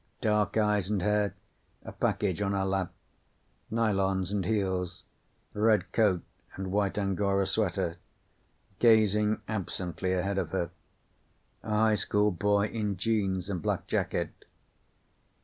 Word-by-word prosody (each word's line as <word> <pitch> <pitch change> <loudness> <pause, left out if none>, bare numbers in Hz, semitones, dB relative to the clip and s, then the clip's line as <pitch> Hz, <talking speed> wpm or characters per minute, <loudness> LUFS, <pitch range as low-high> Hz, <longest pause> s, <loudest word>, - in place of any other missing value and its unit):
Dark 105 -1 +1
eyes 105 -3 +2
and 100 -4 0
hair, 105 -2 +1 0.5
a - - -6
package 100 -2 -1
on 100 -1 0
her 95 -1 0
lap. 95 -2 -1 0.8
Nylons 95 -4 +1
and 100 -2 0
heels. 95 -4 -1 0.5
Red 105 0 +2
coat 100 -6 +2 0.3
and 95 -1 -4
white 100 -1 0
angora 100 0 +1
sweater. 95 -4 0 0.8
Gazing 105 -2 +4
absently 95 -3 -2
ahead 95 +2 0
of 90 -4 -2
her. 85 -3 -1 0.9
A 110 - -9
high 110 +1 +3
school 105 0 +2
boy 100 +2 +2
in 105 -3 -2
jeans 95 -3 0
and 95 -4 -3
black - - -1
jacket. - - -1
100 Hz, 125 wpm, -29 LUFS, 95-105 Hz, 0.9 s, Gazing